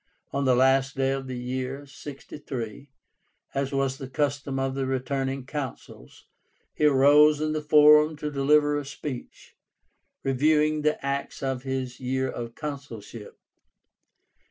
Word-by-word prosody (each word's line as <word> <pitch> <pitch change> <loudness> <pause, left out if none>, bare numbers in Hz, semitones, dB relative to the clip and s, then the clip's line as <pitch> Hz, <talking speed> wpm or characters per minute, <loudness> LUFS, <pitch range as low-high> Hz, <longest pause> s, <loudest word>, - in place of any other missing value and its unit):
On 140 0 0
the 130 -1 +4
last 135 +2 +3
day 135 0 +1
of 135 -1 -3
the 130 -1 -5
year 130 +3 -4
(63), 140 -3 -8 0.6
as 135 0 -1
was 135 -1 -1
the 135 - -7
custom 140 0 -1
of 135 0 -1
the 135 -1 -2
retiring 135 0 -2
Consuls, 140 -2 -7 0.5
he 150 - +1
arose 145 +2 +6
in 155 0 -1
the 155 - -2
Forum 150 +1 +6
to 150 0 -4
deliver 145 +1 +3
a - - -5
speech, 140 -2 -8 0.7
reviewing 150 +3 +2
the 150 -2 0
acts 140 0 -3
of 135 -2 -2
his 130 -1 -4
year 130 +1 -1
of 115 -2 -6
consulship. 130 -8 -8
135 Hz, 135 wpm, -26 LUFS, 130-145 Hz, 0.7 s, arose